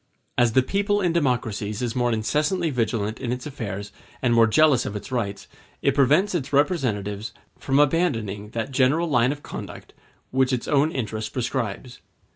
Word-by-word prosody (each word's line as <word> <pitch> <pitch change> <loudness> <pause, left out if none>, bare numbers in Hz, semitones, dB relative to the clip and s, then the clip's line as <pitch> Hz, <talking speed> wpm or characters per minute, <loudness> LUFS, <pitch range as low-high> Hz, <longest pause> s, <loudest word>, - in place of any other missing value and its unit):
As 120 -2 +3
the 130 - +4
people 205 +7 0
in 180 -4 +1
democracies 115 -9 -1
is 120 -2 -2
more 120 -1 +1
incessantly 150 - 0
vigilant 115 -3 -1
in 125 -3 -3
its 125 +3 -4
affairs 105 -8 -5 0.3
and 125 -2 +2
more 115 -1 +6
jealous 145 +2 +4
of 105 - -5
its 105 +6 -7
rights, 105 -6 -3 0.4
it 140 - +3
prevents 150 +9 +3
its 145 -6 -2
representatives 115 - 0 0.3
from 135 0 0
abandoning 115 - +1
that 115 +4 -4
general 140 +6 +2
line 125 -4 +3
of 145 0 -7
conduct - - -8 0.4
which 130 0 +2
its 125 - -2
own 150 +1 +3
interest 110 -5 -4
prescribes. 120 -1 -3
125 Hz, 165 wpm, -24 LUFS, 110-145 Hz, 0.4 s, more